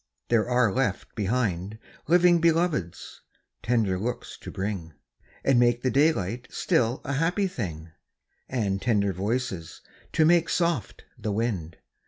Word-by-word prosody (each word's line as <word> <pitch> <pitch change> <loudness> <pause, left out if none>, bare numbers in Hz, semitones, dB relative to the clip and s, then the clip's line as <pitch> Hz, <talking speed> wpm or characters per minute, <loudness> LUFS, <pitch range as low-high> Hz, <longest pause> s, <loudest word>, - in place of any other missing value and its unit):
there 115 0 +2
are 125 -3 +3
left 135 0 -1
behind 105 -2 -1 0.3
Living 175 +1 +5
Beloveds, 165 - 0 0.4
tender 110 -6 +1
looks 120 +4 -4
to - - -8
bring, 95 -5 -4 0.5
And 135 -3 +4
make 120 0 +3
the 130 - +1
daylight 130 - +1
still 120 +2 0
a 140 - -2
happy 170 +8 +1
thing, 85 - -5 0.6
And 100 -6 -1
tender 100 -5 +1
voices, 95 -3 -3 0.3
to 155 - +4
make 170 0 +4
soft 170 - -1 0.2
the 105 - -2
wind. 100 -7 -2
120 Hz, 130 wpm, -26 LUFS, 100-140 Hz, 0.6 s, Living